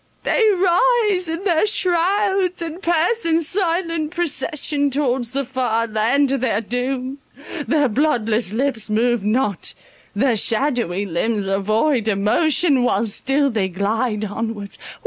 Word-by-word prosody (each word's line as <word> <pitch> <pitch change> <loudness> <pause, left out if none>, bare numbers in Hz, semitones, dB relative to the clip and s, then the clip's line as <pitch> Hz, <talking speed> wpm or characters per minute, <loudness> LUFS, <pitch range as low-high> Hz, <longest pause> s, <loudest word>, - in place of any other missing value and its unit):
They 460 - +1
rise 390 0 +2
in 330 +3 -4
their 360 0 +2
shrouds, 380 0 +1
and 335 +1 -6
pass 345 +6 +1
in 330 -1 +2
silent 335 -2 -1
procession 300 -3 -1
towards 260 -4 -1
the 275 +1 -2
far 240 -3 -1
land 235 +6 +1
of 275 - -1
their 225 -5 +1
doom—their 270 +4 -3
bloodless 230 -5 0
lips 235 -2 -1
move 235 0 +1
not—their 220 +1 -2
shadowy 225 - 0
limbs 200 +3 -1
are 195 0 0
void 225 +4 +1
of 205 -3 +1
motion, 285 - +2
while 230 -3 +1
still 270 +6 +1
they 205 -4 -1
glide 210 +3 -1
onwards. 210 -1 -5
265 Hz, 125 wpm, -20 LUFS, 220-330 Hz, -, rise